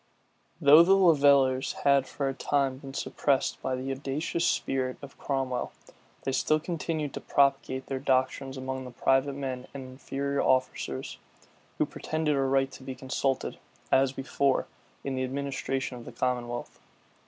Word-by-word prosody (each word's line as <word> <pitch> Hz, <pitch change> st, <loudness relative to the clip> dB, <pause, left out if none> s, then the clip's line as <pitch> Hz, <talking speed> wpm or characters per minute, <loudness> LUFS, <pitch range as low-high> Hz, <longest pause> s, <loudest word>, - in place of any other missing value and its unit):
Though 150 Hz, +3 st, +8 dB
the 190 Hz, +3 st, +6 dB
levellers 140 Hz, -7 st, +4 dB
had 140 Hz, -2 st, +4 dB
for 140 Hz, +1 st, -2 dB
a 135 Hz, -, -1 dB
time 135 Hz, 0 st, 0 dB
been 135 Hz, -1 st, -9 dB
suppressed 140 Hz, -1 st, 0 dB
by 130 Hz, -1 st, -1 dB
the 130 Hz, +1 st, -4 dB
audacious 140 Hz, +5 st, -1 dB
spirit 130 Hz, -1 st, 0 dB
of 140 Hz, -1 st, -11 dB
Cromwell, 135 Hz, -3 st, -2 dB, 0.5 s
they 135 Hz, -, -1 dB
still 155 Hz, +3 st, +2 dB
continued 155 Hz, -3 st, -3 dB
to -, -, -5 dB
propagate 135 Hz, -1 st, +1 dB
their 135 Hz, -1 st, -3 dB
doctrines 130 Hz, 0 st, 0 dB
among 130 Hz, 0 st, -4 dB
the -, -, -7 dB
private 135 Hz, +3 st, +1 dB
men 130 Hz, -2 st, -4 dB
and 135 Hz, -, -5 dB
inferior 140 Hz, +1 st, -2 dB
officers, 130 Hz, -, 0 dB, 0.6 s
who -, -, +2 dB
pretended 155 Hz, -2 st, -1 dB
a 135 Hz, -, +1 dB
right 135 Hz, 0 st, +2 dB
to -, -, -11 dB
be 130 Hz, 0 st, -6 dB
consulted, 135 Hz, 0 st, -2 dB, 0.3 s
as 135 Hz, 0 st, +4 dB
before, 135 Hz, 0 st, 0 dB, 0.4 s
in 135 Hz, -, -3 dB
the 130 Hz, 0 st, -1 dB
administration 135 Hz, -1 st, -3 dB
of 115 Hz, -, -12 dB
the -, -, -8 dB
commonwealth. 120 Hz, -1 st, -3 dB
135 Hz, 155 wpm, -28 LUFS, 130-140 Hz, 0.6 s, Though